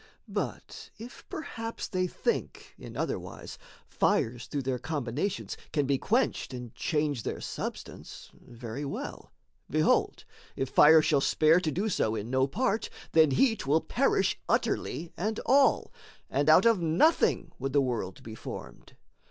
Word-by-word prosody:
But -, -, -5 dB
if 235 Hz, +3 st, -12 dB
perhaps 230 Hz, -7 st, -5 dB
they 185 Hz, -1 st, -1 dB
think, -, -, -3 dB
in -, -, -9 dB
other -, -, -1 dB
wise, -, -, -10 dB, 0.3 s
Fires 120 Hz, +1 st, 0 dB
through 145 Hz, -2 st, -3 dB
their 130 Hz, -1 st, -2 dB
combinations 150 Hz, -, -3 dB, 0.2 s
can 145 Hz, -3 st, +1 dB
be 135 Hz, 0 st, +1 dB
quenched 230 Hz, -, 0 dB
And 125 Hz, -2 st, -8 dB
change 150 Hz, -5 st, -1 dB
their -, -, -4 dB
substance, -, -, -7 dB
very 120 Hz, +2 st, -8 dB
well: 140 Hz, -, -6 dB, 0.4 s
behold, -, -, +1 dB, 0.3 s
If 135 Hz, -, -2 dB
fire 155 Hz, +1 st, +7 dB
shall 150 Hz, -3 st, +2 dB
spare 155 Hz, +4 st, +4 dB
to 165 Hz, -4 st, -1 dB
do 195 Hz, +9 st, -1 dB
so 110 Hz, -, 0 dB
in 110 Hz, +2 st, -5 dB
no 130 Hz, 0 st, +2 dB
part, 220 Hz, -, -1 dB, 0.2 s
Then 160 Hz, -2 st, +5 dB
heat 220 Hz, -, +2 dB
will 150 Hz, +3 st, +4 dB
perish -, -, +1 dB
utterly 165 Hz, +1 st, -1 dB
and 215 Hz, +4 st, -2 dB
all, 270 Hz, +3 st, +3 dB, 0.4 s
And 145 Hz, +2 st, +1 dB
out 160 Hz, +6 st, +7 dB
of 225 Hz, -5 st, +4 dB
nothing 170 Hz, -, +2 dB
would 135 Hz, +1 st, -2 dB
the 145 Hz, -, +5 dB
world 120 Hz, -8 st, -2 dB
be 110 Hz, -, -8 dB
formed. -, -, -9 dB
150 Hz, 150 wpm, -29 LUFS, 130-195 Hz, 0.4 s, fire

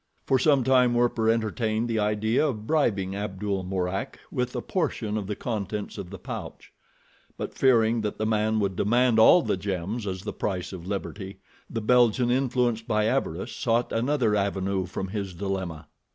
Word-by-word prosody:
For 130 Hz, -, +3 dB
some 140 Hz, 0 st, +4 dB
time 125 Hz, -1 st, +4 dB
Werper 120 Hz, -2 st, +2 dB
entertained 110 Hz, 0 st, 0 dB
the 115 Hz, -2 st, 0 dB
idea 110 Hz, +6 st, +1 dB
of 110 Hz, -6 st, -4 dB
bribing 100 Hz, -10 st, +1 dB
Abdul 100 Hz, -1 st, -3 dB
Mourak 90 Hz, 0 st, -3 dB
with 125 Hz, 0 st, -2 dB
a -, -, -1 dB
portion 115 Hz, -, -2 dB
of 105 Hz, -3 st, -3 dB
the 105 Hz, -, -2 dB
contents 105 Hz, -3 st, -4 dB
of 95 Hz, -3 st, -6 dB
the 95 Hz, -, -8 dB
pouch; -, -, -8 dB, 0.6 s
but -, -, -5 dB
fearing 115 Hz, -3 st, +3 dB
that 105 Hz, -1 st, -3 dB
the 110 Hz, -, -1 dB
man 110 Hz, 0 st, +1 dB
would 100 Hz, -2 st, 0 dB
demand 120 Hz, +4 st, +3 dB
all 165 Hz, +9 st, +7 dB
the -, -, 0 dB
gems 100 Hz, +3 st, -3 dB
as 95 Hz, -1 st, -4 dB
the -, -, -4 dB
price 95 Hz, -2 st, -3 dB
of 90 Hz, -1 st, -8 dB
liberty, 100 Hz, -1 st, -5 dB, 0.3 s
the 115 Hz, -, -3 dB
Belgian, 120 Hz, +1 st, +3 dB
influenced 125 Hz, -3 st, +1 dB
by 105 Hz, -2 st, +1 dB
avarice, 110 Hz, -8 st, -1 dB
sought 120 Hz, 0 st, 0 dB
another 120 Hz, -2 st, +1 dB
avenue 100 Hz, -2 st, -1 dB
from 95 Hz, +2 st, -4 dB
his 100 Hz, -3 st, -4 dB
dilemma. 95 Hz, -4 st, -4 dB
110 Hz, 170 wpm, -26 LUFS, 95-120 Hz, 0.6 s, all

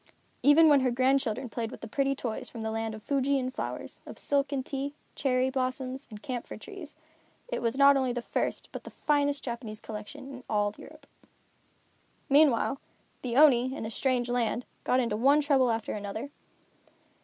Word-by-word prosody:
Even 305 Hz, +3 st, +7 dB
when 290 Hz, -2 st, +6 dB
her 260 Hz, -1 st, +2 dB
grandchildren 255 Hz, -1 st, +1 dB
played 230 Hz, -1 st, -3 dB
with -, -, -10 dB
the -, -, -6 dB
pretty 275 Hz, +4 st, 0 dB
toys 235 Hz, -4 st, -4 dB
from 230 Hz, -2 st, -7 dB
the 220 Hz, -, -2 dB
land 225 Hz, 0 st, -2 dB
of 215 Hz, -, -11 dB
Fuji 280 Hz, 0 st, +1 dB
and 255 Hz, -1 st, -2 dB
flowers, -, -, -5 dB
of -, -, -9 dB
silk 280 Hz, 0 st, 0 dB
and 265 Hz, -2 st, -2 dB
tea, 280 Hz, +1 st, -4 dB, 0.2 s
cherry 260 Hz, -1 st, +1 dB
blossoms 260 Hz, +1 st, -3 dB
and 210 Hz, -1 st, -10 dB
camphor 250 Hz, -4 st, -5 dB
trees, 325 Hz, -, -10 dB, 0.5 s
it -, -, -3 dB
was 235 Hz, +2 st, 0 dB
not 280 Hz, 0 st, +7 dB
only 260 Hz, -2 st, +1 dB
the 245 Hz, 0 st, -3 dB
first -, -, -2 dB
but -, -, -7 dB
the -, -, -9 dB
finest 285 Hz, -1 st, 0 dB
Japanese 235 Hz, -3 st, -5 dB
collection 225 Hz, +6 st, -8 dB
in 255 Hz, -1 st, -10 dB
all 205 Hz, -1 st, +1 dB
Europe. -, -, -13 dB, 1.2 s
Meanwhile, 275 Hz, -2 st, +4 dB, 0.4 s
the 245 Hz, -2 st, -3 dB
Oni, 260 Hz, -3 st, +6 dB
in 225 Hz, -, -5 dB
a 220 Hz, -, -5 dB
strange 250 Hz, 0 st, 0 dB
land, 245 Hz, 0 st, 0 dB, 0.2 s
got 255 Hz, -, +2 dB
into 230 Hz, -4 st, 0 dB
one 275 Hz, +7 st, +4 dB
trouble 275 Hz, -4 st, +3 dB
after 225 Hz, -1 st, -1 dB
another. 215 Hz, +6 st, -5 dB
255 Hz, 180 wpm, -29 LUFS, 230-275 Hz, 1.2 s, Even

